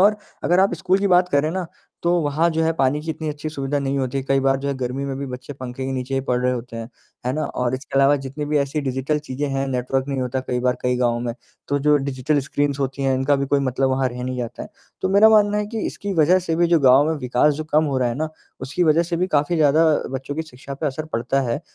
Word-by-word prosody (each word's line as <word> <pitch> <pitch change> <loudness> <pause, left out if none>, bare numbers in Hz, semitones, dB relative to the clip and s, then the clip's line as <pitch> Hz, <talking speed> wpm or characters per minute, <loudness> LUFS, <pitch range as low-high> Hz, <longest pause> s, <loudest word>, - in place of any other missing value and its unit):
और 210 +2 +5 0.3
अगर 175 +2 +4
आप 190 -2 +3
स्कूल 185 +3 +1
की 200 - 0
बात 180 0 +4
करें 145 +1 +1
ना, 185 0 -3 0.4
तो 170 - +2
वहाँ 150 +3 +1
जो 160 0 0
है 165 - +2
पानी 145 -1 +1
की 160 - -3
इतनी 155 0 -4
अच्छी 150 +1 -4
सुविधा 145 -1 -2
नहीं 140 0 -1
होती 135 +1 -1
कई 135 0 +1
बार 135 0 +2
जो 140 +1 -3
है 140 - -1
गर्मी 130 +2 -3
में 135 -1 -3
भी 140 - -4
बच्चे 130 +2 -7
पंखे 130 -1 -6
के 135 - -2
नीचे 130 +1 -3
ही 135 - +1
पढ़ 125 - +2
रहे 125 - +2
होते 120 -1 -6
हैं, 115 0 -6 0.4
है 125 - +1
ना? 155 +2 -1
और 125 0 -2
इसके 135 +2 -8
अलावा 140 +1 +5
जितनी 135 +2 -5
भी 150 0 +1
ऐसी 140 +2 -1
डिजिटल 135 +2 -1
चीज़ें 145 -1 -4
हैं, 135 0 0
नेटवर्क 130 +1 -1
नहीं 135 -2 -1
होता 130 +1 -2
कई 125 -1 -2
बार 125 0 +1
कई 125 0 +1
गाँव 120 -1 +1
में, 120 -1 -3 0.3
तो 145 0 +1
जो 150 +1 +4
डिजिटल 140 +1 0
स्क्रीन्स 145 +1 -1
होती 135 0 -2
हैं 135 -1 +2
इनका 135 +2 +2
भी 140 0 -1
कोई 140 +1 +2
मतलब 135 0 0
वहाँ 130 0 +1
रह 125 0 -7
नहीं 130 0 -3
जाता 120 -1 -5
है। - - -8 0.3
तो - - +1
मेरा 200 +3 +6
मानना 210 -1 +4
है 210 - -1
कि 220 +1 -4
इसकी 200 -1 -4
वजह 170 +3 +4
से 165 -3 -2
भी 175 - +3
जो 170 -1 +3
गाँव 135 +1 +6
में 160 - +1
विकास 130 +4 +2
जो 155 - -5
कम 155 +1 +4
हो 135 -3 0
रहा 125 - +1
है 120 - -2
ना 155 - -1 0.3
उसकी 140 +7 -1
वजह 160 +1 +4
से 170 0 -3
भी 180 +2 +1
काफ़ी 150 +4 +1
ज़्यादा 155 +1 +4 0.3
बच्चों 135 +2 -4
की 160 - -2
शिक्षा 140 -2 -9
पे 150 +3 -3
असर 150 +2 -3
पड़ता 120 +4 0
है, 130 - -1
140 Hz, 280 wpm, -22 LUFS, 130-155 Hz, 0.4 s, मेरा